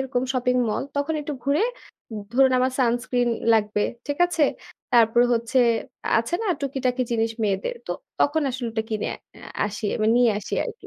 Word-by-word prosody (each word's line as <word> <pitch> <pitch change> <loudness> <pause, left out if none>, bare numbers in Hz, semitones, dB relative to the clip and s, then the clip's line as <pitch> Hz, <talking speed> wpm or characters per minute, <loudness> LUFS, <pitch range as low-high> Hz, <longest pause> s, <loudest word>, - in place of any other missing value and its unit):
ওরকম 265 -2 -1
shopping 250 -1 +1
mall 215 - -1
তখন 285 +3 0
একটু 295 0 -5
ঘুরে 280 +6 +2 0.7
ধরুন 265 +1 +4
আমার 255 +1 +1
সানস্ক্রিন 245 0 +1 0.2
লাগবে। 210 -1 +2 0.2
ঠিক 285 -1 -3
আছে। 350 -3 -1 0.5
তারপরে 235 0 +5
হচ্ছে, 235 +3 0 0.6
আছে 230 +9 -2
না - - -2
টুকিটাকি 260 -2 -1
জিনিস 225 -1 +1
মেয়েদের। 200 - -1
তো - - -5 0.3
তখন 305 +2 +2
আসলে 250 -1 -4
ওটা 220 0 -1
কিনে 215 -2 -2
আ - - -9 0.5
আসি। 210 +1 -6
আমি 215 - 0
নিয়ে 245 -1 +5
আসি 210 - -5
আরকি। 470 -2 -8
245 Hz, 165 wpm, -24 LUFS, 225-275 Hz, 0.7 s, তারপরে